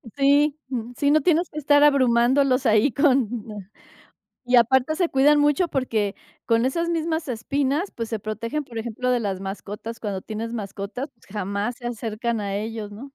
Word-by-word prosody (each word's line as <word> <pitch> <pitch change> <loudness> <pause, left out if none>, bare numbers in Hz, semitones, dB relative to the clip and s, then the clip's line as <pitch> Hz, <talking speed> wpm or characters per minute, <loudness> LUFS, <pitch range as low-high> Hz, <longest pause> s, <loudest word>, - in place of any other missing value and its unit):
Sí, 285 +2 +3
mm, 240 -2 -4
sí, 285 -1 +2
no 310 -1 +4
tienes 340 +2 +2
que 305 - -6
estar 290 0 +4
abrumándolos 260 0 +3
ahí 220 +4 +4
con 265 -2 +3 1.2
y 245 0 +4
aparte 265 +6 +3
se 355 -2 +2
cuidan 290 +2 +4
mucho 295 +4 +2
porque 220 -6 -1 0.3
con 230 +1 +2
esas 335 +6 0
mismas 320 -2 -1
espinas, 280 - -1
pues 230 -1 -4
se 225 -2 -3
protegen, 230 +8 -4
por 235 -3 -9
ejemplo, 235 +2 -3
de 245 -2 +2
las 195 -3 -2
mascotas. 205 +3 -7
Cuando 200 -3 -3
tienes 225 +1 -5
mascotas, 210 +5 -5
pues 230 - -26
jamás 205 +3 -3
se 240 - -6
acercan 230 -1 -3
a 200 -1 -3
ellos, 215 -1 -5
¿no? 210 +4 -10
245 Hz, 175 wpm, -23 LUFS, 220-285 Hz, 1.2 s, no